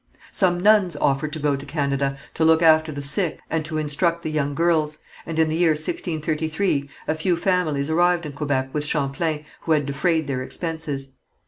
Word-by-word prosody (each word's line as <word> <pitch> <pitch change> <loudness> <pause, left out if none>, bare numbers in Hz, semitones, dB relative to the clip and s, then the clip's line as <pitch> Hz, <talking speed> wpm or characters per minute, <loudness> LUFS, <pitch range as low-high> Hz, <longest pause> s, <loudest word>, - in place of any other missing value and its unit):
Some 180 -3 +2
nuns 200 -3 +4
offered 145 +1 0
to - - -3
go 145 -2 +1
to 135 - -7
Canada 140 -1 -1 0.2
to - - 0
look 160 +1 +5
after 160 -1 +5
the 145 -1 -5
sick 150 +4 -1
and 160 0 0
to 155 0 -4
instruct 165 +3 0
the 155 - -3
young 145 -2 -1
girls, 160 -2 +1 0.3
and 165 -1 -4
in 160 -1 +4
the 155 - -1
year 170 -2 +4
1633 155 0 -2 0.2
a - - +2
few 165 +2 0
families 165 -6 0
arrived 175 +1 +2
in 150 - -5
Quebec 140 -2 -1
with 150 - -1
Champlain, 150 +1 0
who 160 - 0
had 150 -2 +1
defrayed 160 +3 0
their 135 -2 -2
expenses. 150 -2 -3
155 Hz, 190 wpm, -23 LUFS, 145-165 Hz, 0.3 s, look